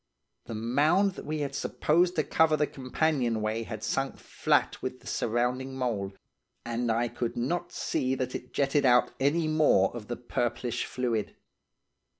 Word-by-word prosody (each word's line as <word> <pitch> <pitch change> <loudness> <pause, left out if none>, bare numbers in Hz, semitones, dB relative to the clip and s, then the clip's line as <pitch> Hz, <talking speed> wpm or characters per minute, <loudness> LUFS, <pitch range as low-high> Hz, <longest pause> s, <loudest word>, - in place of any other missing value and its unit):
The 115 - -6
mound 145 - +3
that - - -9
we 155 0 -2
had 140 -1 -2
supposed 175 +5 +1
to 155 - +2
cover 155 0 +3
the 150 - +3
companionway 125 -6 0
had 110 -1 -6
sunk 135 +3 -1
flat - - 0
with 130 0 -4
the - - -21
surrounding 125 +3 -1
mould, 105 -7 -2 0.5
and 120 0 -1
I 120 +2 +1
could 120 +1 -4
not 135 +9 -1
see 130 +1 -1
that 130 -1 -3
it 125 - -6
jetted 140 +1 +2
out 125 -1 +5
any 155 +4 +2
more 150 -11 +3
of 110 -3 -7
the 120 - -4
purplish 120 0 -2
fluid. 120 -4 -2
125 Hz, 155 wpm, -29 LUFS, 120-145 Hz, 0.5 s, out